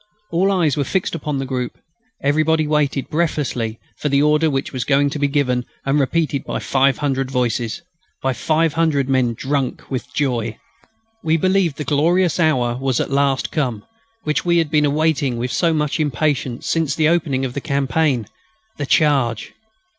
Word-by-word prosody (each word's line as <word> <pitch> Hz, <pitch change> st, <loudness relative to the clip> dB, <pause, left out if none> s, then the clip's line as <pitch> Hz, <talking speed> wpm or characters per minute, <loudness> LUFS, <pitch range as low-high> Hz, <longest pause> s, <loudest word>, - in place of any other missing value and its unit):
All 185 Hz, +4 st, +2 dB
eyes 170 Hz, -7 st, +2 dB
were 145 Hz, -, 0 dB
fixed 185 Hz, +7 st, -1 dB
upon 150 Hz, -4 st, -3 dB
the 135 Hz, -, -2 dB
group. 125 Hz, -2 st, -3 dB, 0.5 s
Everybody 155 Hz, +2 st, +2 dB
waited 150 Hz, -2 st, 0 dB
breathlessly 145 Hz, -8 st, -1 dB, 0.2 s
for 150 Hz, -, -1 dB
the 140 Hz, 0 st, +3 dB
order 150 Hz, +2 st, +3 dB
which 135 Hz, -1 st, -2 dB
was 130 Hz, -2 st, -2 dB
going 140 Hz, 0 st, +2 dB
to 150 Hz, -, -4 dB
be 145 Hz, -, +2 dB
given 135 Hz, -4 st, 0 dB, 0.2 s
and 135 Hz, +2 st, +2 dB
repeated 145 Hz, 0 st, 0 dB
by -, -, -3 dB
five 135 Hz, +3 st, +2 dB
hundred 135 Hz, -2 st, -1 dB
voices, 125 Hz, +2 st, -1 dB, 0.4 s
by 135 Hz, 0 st, +1 dB
five 160 Hz, +4 st, +1 dB
hundred 155 Hz, -5 st, +1 dB
men 130 Hz, -3 st, +1 dB
drunk 135 Hz, +1 st, -3 dB
with 130 Hz, -1 st, -4 dB
joy. 120 Hz, -6 st, -1 dB, 0.7 s
We 160 Hz, 0 st, +2 dB
believed 185 Hz, -3 st, +1 dB
the 150 Hz, -, -3 dB
glorious 165 Hz, +5 st, +2 dB
hour 125 Hz, -7 st, +2 dB
was 135 Hz, -3 st, 0 dB
at -, -, -2 dB
last 140 Hz, -1 st, +1 dB
come, 125 Hz, -9 st, -2 dB, 0.4 s
which 150 Hz, 0 st, 0 dB
we 175 Hz, -1 st, +2 dB
had 165 Hz, -3 st, +1 dB
been 150 Hz, -2 st, +3 dB
awaiting 145 Hz, -3 st, +1 dB
with 125 Hz, +2 st, -2 dB
so 170 Hz, -2 st, +2 dB
much 150 Hz, 0 st, 0 dB
impatience 145 Hz, -4 st, -1 dB
since 160 Hz, -4 st, 0 dB
the 155 Hz, -1 st, +3 dB
opening 150 Hz, -6 st, +1 dB
of 125 Hz, -, -4 dB
the 140 Hz, -, -4 dB
campaign. 140 Hz, -3 st, 0 dB, 0.5 s
The 145 Hz, -, -3 dB
charge! 135 Hz, -9 st, +2 dB
145 Hz, 175 wpm, -20 LUFS, 130-155 Hz, 0.7 s, the